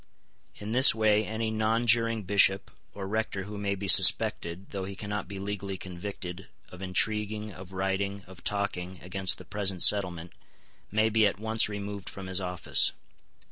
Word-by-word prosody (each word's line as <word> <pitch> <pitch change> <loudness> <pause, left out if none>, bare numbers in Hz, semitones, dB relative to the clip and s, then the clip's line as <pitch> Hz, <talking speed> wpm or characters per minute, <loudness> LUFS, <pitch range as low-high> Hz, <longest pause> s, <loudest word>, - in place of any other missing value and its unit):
In 105 +1 -8
this 130 -1 +7
way 110 -1 +2
any 110 0 -3
nonjuring 115 0 +1
bishop 100 0 +3 0.2
or 100 -1 -6
rector 105 -2 -3
who 105 +2 -9
may 100 -1 -2
be 100 +1 -6
suspected, 85 0 +4
though 100 -2 -5
he 100 0 -8
cannot 105 -1 -5
be 100 0 -8
legally 100 -1 -5
convicted, 90 0 -8 0.2
of 90 - -13
intriguing, 105 +2 -1
of 95 +1 -12
writing, 95 +1 -3
of 95 -1 -15
talking, 95 -3 -3
against 95 0 -1
the - - -13
present 100 -3 +1
settlement, 90 -4 +2 0.6
may 110 +2 +1
be 110 -1 +3
at 100 - -4
once 110 0 +1
removed 100 -1 -6
from 95 - -9
his 95 +1 0
office. 90 -1 +3
100 Hz, 160 wpm, -27 LUFS, 95-105 Hz, 0.6 s, this